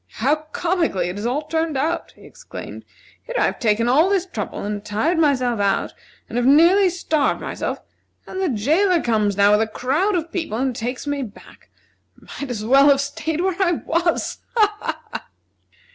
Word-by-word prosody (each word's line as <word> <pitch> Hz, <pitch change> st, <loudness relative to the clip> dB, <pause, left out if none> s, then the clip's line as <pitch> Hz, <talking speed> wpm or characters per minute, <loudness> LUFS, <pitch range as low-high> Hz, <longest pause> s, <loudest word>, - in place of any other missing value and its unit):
"How 275 Hz, +7 st, +1 dB
comically 330 Hz, -, 0 dB
it 180 Hz, -, -6 dB
has 210 Hz, +3 st, -2 dB
all 275 Hz, +5 st, -1 dB
turned 320 Hz, -2 st, -1 dB
out!" 320 Hz, +6 st, -2 dB
he -, -, -18 dB
exclaimed. -, -, -10 dB, 0.4 s
"Here -, -, -8 dB
I've -, -, +1 dB
taken 230 Hz, 0 st, +1 dB
all 300 Hz, +9 st, +4 dB
this 390 Hz, -2 st, +1 dB
trouble, 365 Hz, -, -5 dB
and 205 Hz, 0 st, -4 dB
tired 220 Hz, +12 st, 0 dB
myself 255 Hz, -7 st, +2 dB
out, 200 Hz, -1 st, 0 dB, 0.3 s
and 240 Hz, -, -2 dB
have 245 Hz, -, +1 dB
nearly 345 Hz, +7 st, +6 dB
starved 320 Hz, -4 st, 0 dB
myself, -, -, -4 dB, 0.5 s
and 375 Hz, -, -5 dB
the 375 Hz, -, +1 dB
jailer 320 Hz, -, +2 dB
comes 210 Hz, -4 st, +1 dB
now, 200 Hz, 0 st, +5 dB
with 210 Hz, +1 st, +4 dB
a 220 Hz, -, +1 dB
crowd 310 Hz, -, 0 dB
of 335 Hz, -1 st, -2 dB
people, 320 Hz, -11 st, -3 dB
and 260 Hz, 0 st, -1 dB
takes 245 Hz, +5 st, -4 dB
me 285 Hz, -1 st, -2 dB
back. 215 Hz, -6 st, -11 dB, 0.5 s
I -, -, -20 dB, 0.2 s
might 280 Hz, -, -4 dB
as 215 Hz, -3 st, -4 dB
well 275 Hz, +4 st, +6 dB
have 275 Hz, -1 st, +5 dB
staid 300 Hz, +3 st, -2 dB
where 375 Hz, -1 st, 0 dB
I 350 Hz, -2 st, +3 dB
was. 335 Hz, +1 st, -1 dB, 0.2 s
Ha! 420 Hz, -2 st, +4 dB, 0.4 s
ha!" -, -, -7 dB
285 Hz, 185 wpm, -21 LUFS, 230-340 Hz, 0.5 s, nearly